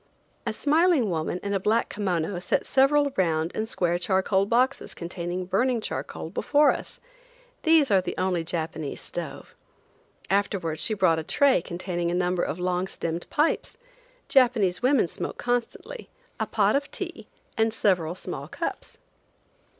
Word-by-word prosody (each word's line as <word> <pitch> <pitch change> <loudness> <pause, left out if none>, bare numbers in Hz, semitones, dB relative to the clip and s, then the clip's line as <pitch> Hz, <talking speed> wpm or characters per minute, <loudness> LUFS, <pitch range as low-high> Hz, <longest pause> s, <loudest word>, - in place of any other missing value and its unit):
A - - +1
smiling 305 - +2
woman 165 +2 -2
in 200 0 -2
a 195 - +1
black 220 +4 +1
kimono 180 -3 -1
set 180 - 0
several 280 +1 +3
round 165 -2 +1
and 220 0 -3
square 175 -5 0
charcoal 190 +1 +1
boxes 250 +4 +1
containing 175 +1 -4
burning 235 +6 +1
charcoal 215 - -5
before 295 +1 +3
us. - - -6 0.6
These 320 -5 +4
are 195 -2 +5
the - - -5
only 185 -2 0
Japanese 160 -3 -4
stove. - - -7 0.7
Afterwards 190 -5 0
she 215 - -1
brought 185 -5 +3
a - - -4
tray 275 - +3
containing 175 0 -3
a 175 - -1
number 180 0 +1
of 160 - -2
long 180 +1 -1
stemmed 165 -2 -4
pipes–Japanese 305 - 0
women 255 -6 +3
smoke - - -2
constantly–a 480 - -4
pot - - +2
of 285 +1 -1
tea - - -6 0.3
and 225 0 +2
several 180 -6 +1
small - - -6
cups. - - -5
195 Hz, 140 wpm, -26 LUFS, 175-260 Hz, 0.7 s, are